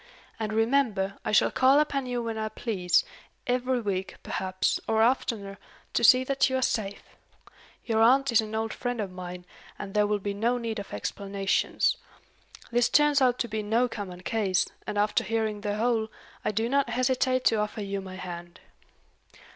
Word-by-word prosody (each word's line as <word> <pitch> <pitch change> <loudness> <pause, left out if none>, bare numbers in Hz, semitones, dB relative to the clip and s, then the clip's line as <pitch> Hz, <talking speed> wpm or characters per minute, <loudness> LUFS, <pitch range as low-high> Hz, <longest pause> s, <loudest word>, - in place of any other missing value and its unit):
And, 215 -1 -2
remember, 220 -4 +1
I - - -2
shall 210 - +4
call 265 +2 +5
upon 280 -3 0
you 245 -1 -2
when 230 -1 -3
I 220 0 -2
please, 195 -6 +1 0.4
every 250 0 0
week, 195 -3 -3
perhaps, 185 0 -1
or 220 0 +3
oftener, 215 -5 0 0.3
to - - +1
see 255 +3 +7
that 275 +1 +2
you 260 - -1
are 260 - 0
safe. 205 -4 -2 0.8
Your 225 -2 +1
aunt 265 +3 +5
is 225 - +5
an 220 0 -6
old 220 0 -2
friend 245 -1 -3
of 200 -3 -3
mine, 180 -1 -8 0.3
and 195 - -7
there 210 -1 +3
will 210 0 +1
be 200 0 -4
no 230 +5 0
need 230 -2 -3
of 200 - -8
explanations. 195 - -1 0.7
This 240 0 +3
turns 295 -1 +4
out 250 -1 +3
to 240 - -1
be 215 -1 -3
no 225 +4 +1
common 195 -6 -7
case, 195 -2 +1 0.2
and 210 - -3
after 210 +3 +2
hearing 220 -1 -1
the 205 0 -2
whole, 225 0 0 0.3
I - - 0
do 220 +2 0
not 275 0 +1
hesitate 255 +1 +1
to 225 - +4
offer 210 +1 -2
you 200 0 -3
my 190 -1 -9
hand." 175 -1 -8
220 Hz, 180 wpm, -27 LUFS, 200-245 Hz, 0.8 s, see